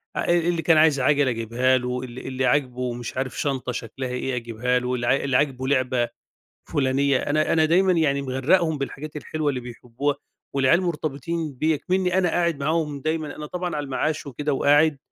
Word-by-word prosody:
آآ - - -1
اللي 170 0 0
كان 165 -1 +4
عايز 155 -3 +5
عَجَلة 140 +1 +3
أجيبها 120 +3 +1
له، 125 0 -3
ال 125 0 -8
اللي 130 0 -1
عاجبه 125 -3 0
مش 120 0 -7
عارف 130 -1 -3
شنطة 130 -3 -1
شكْلها 125 +2 -5
إيه 125 +1 -2
أجيبها 120 +1 -1
له، 125 0 -2
اللي 120 +2 +1
اللي 135 -2 +2
عاجبه 130 -3 0
لعبة 130 -3 +1 0.6
فلانية، 140 0 +1
أنا 155 +4 +1
أنا 160 -1 +4
دايمًا 185 +4 +3
يعني 150 -5 +2
مغرّقهم 145 +5 +1
بالحاجات 145 +2 -6
الحلوة 150 0 -2
اللي 130 -3 -2
بيحبّوها 125 +3 -3 0.4
والعيال 140 +6 +3
مرتبطين 155 -1 -3
بيَّ 155 +5 +1
إكمنّي 185 +3 0
أنا 185 -2 +3
قاعد 170 -2 +1
معاهم 150 -1 -1
دايمًا، 155 0 -2
أنا 150 - -6
طبعًا 180 +2 -4
على 145 - -2
المعاش 145 +3 -2
وكده 145 +2 -2
وقاعد 145 +2 +4
140 Hz, 180 wpm, -24 LUFS, 125-155 Hz, 0.6 s, عايز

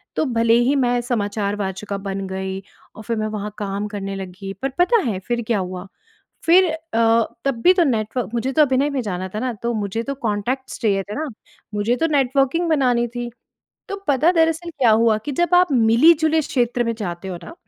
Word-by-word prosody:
तो - - +1
भले 230 -3 +2
ही 240 +4 +3
मैं 245 -3 +2
समाचार 205 -4 -2
वाचिका 200 0 -4
बन 195 0 -3
गई 190 0 -4 0.4
और 215 - -10
फिर 230 +1 -2
मैं 215 0 -1
वहाँ 210 -1 -5
काम 205 0 -3
करने 195 -2 -5
लगी 195 +1 -7
पर 270 - 0
पता 440 +6 +4
है 200 -5 -2
फिर 240 0 0
क्या 230 -4 +1
हुआ, 185 0 -5 0.6
फिर 355 +1 +5
अ, - - -3 0.7
तब 265 -4 -1
भी 365 - +7
तो 360 -2 +3
नेटव 230 - -1
मुझे 240 +3 -1
तो 310 - +4
अभिनय 275 0 +3
में 280 -3 -2
जाना 185 -4 -4
था - - -1
ना, 250 +1 -2
तो 235 +2 -3
मुझे 215 +1 -2
तो 275 +3 -4
कॉन्टैक्ट्स 245 +2 -3
चाहिए 200 -4 +1
थे 205 +2 -7
ना, 315 +1 -3 0.5
मुझे 210 +4 +1
तो 325 - +1
नेटवर्किंग 275 +4 +2
बनानी 250 -6 +2
थी। 240 0 -6 0.6
तो 395 - -4
पता 290 +4 +4
दरअसल 325 0 +1
क्या 255 -8 +2
हुआ 220 0 +4
कि 290 - -2
जब 345 +5 +1
आप 360 0 +5
मिली-जुले 305 +7 +4
क्षेत्र 245 -4 0
में 230 0 -1
जाते 180 -2 -5
हो 180 - -4
ना, - - -10
235 Hz, 205 wpm, -21 LUFS, 205-275 Hz, 0.7 s, भी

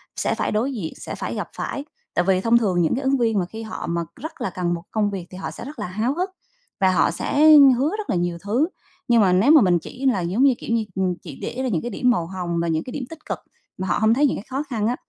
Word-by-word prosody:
sẽ - - 0
phải - - -1
đối 235 +6 0
diện, 190 -10 -4
sẽ - - -6
phải - - -4
gặp - - -4
phải. 280 - -4 0.3
Tại 175 - +1
vì 185 -1 +3
thông 230 +3 +4
thường 190 -6 +1
những 165 - +2
cái 270 - -3
ứng 270 +1 +2
viên 225 -4 +2
mà 180 - 0
khi 220 +5 -8
họ 220 - -6
mà 170 0 0
rất 315 +4 -8
là - - -1
cần 175 0 -2
một 170 - -4
cái - - -30
công 210 -2 +1
việc 185 -3 -5
thì 185 - -9
họ 190 - -5
sẽ - - -9
rất 290 +3 -9
là - - -3
háo 215 +8 -1
hức 365 +3 -1 0.5
và 190 -2 +4
họ 185 - +3
sẽ 290 - +2 0.3
hứa 275 +5 +2
rất 430 - -6
là - - +1
nhiều 175 -1 -1
thứ, 235 +10 +1 0.4
nhưng 235 -2 +5
mà 190 -3 +4
nếu 195 +11 +4
mà 310 -3 +8
mình 180 -4 +3
chỉ 255 - -8
là, 245 -8 +3
giống 185 +9 +1
như, 275 -2 +6
kiểu 230 - -1
như, 225 - +1
ừm, 190 -1 +1
chỉ 150 -6 -10
để - - -4
ra - - 0
những 175 -8 0
cái 240 - -5
điểm 250 - +1
màu 170 -8 0
hồng 175 -2 -3
và 170 - -1
những 160 -1 0
cái 255 - -8
điểm 280 - -4
tích 325 -1 -12
cực - - -3 0.4
mà 190 0 -3
họ - - +1
hông 220 +2 +4
thấy 285 +4 +4
những - - -1
cái 205 - -8
khó 270 +2 -2
khăn 220 -4 -1
á, 245 - +1
215 Hz, 305 wpm, -22 LUFS, 180-255 Hz, 0.5 s, mà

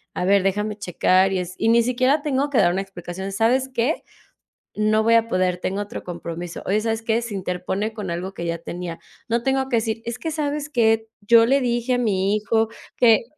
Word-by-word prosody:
a 180 - -1
ver, 195 0 +4
déjame 210 +2 0
checar 185 0 +2
y 190 - 0
es 180 0 -5
y 225 - +1
ni 235 +1 +5
siquiera 255 +5 +2
tengo 285 -1 0
que 265 - +3
dar 175 -3 +4
una 190 +2 -1
explicación, 190 0 -7
¿sabes 235 +6 +2
qué? 255 +6 0 0.7
No 215 +1 +2
voy 230 +1 +4
a 230 0 +4
poder. 185 -4 +1
Tengo 190 +2 -3
otro 205 0 -6
compromiso. 170 -1 -6
Oye, 210 +3 +1
¿sabes 225 0 -1
qué? 230 0 0
Se 235 -2 -6
interpone 190 +3 -3
con 205 -5 -5
algo 180 +3 -4
que 170 - -5
ya 170 0 -2
tenía. 170 0 -6 0.3
No 235 0 0
tengo 265 +1 0
que 240 - +2
decir 225 0 -1
es 235 0 -4
que, 325 - -3
¿sabes 300 -1 -2
que? 225 -4 +2
Yo 230 +2 +6
le 275 +2 +3
dije 240 +1 0
a - - 0
mi 200 -3 +1
hijo 220 +1 +1 0.3
que 230 -2 +5
220 Hz, 215 wpm, -22 LUFS, 190-235 Hz, 0.7 s, Yo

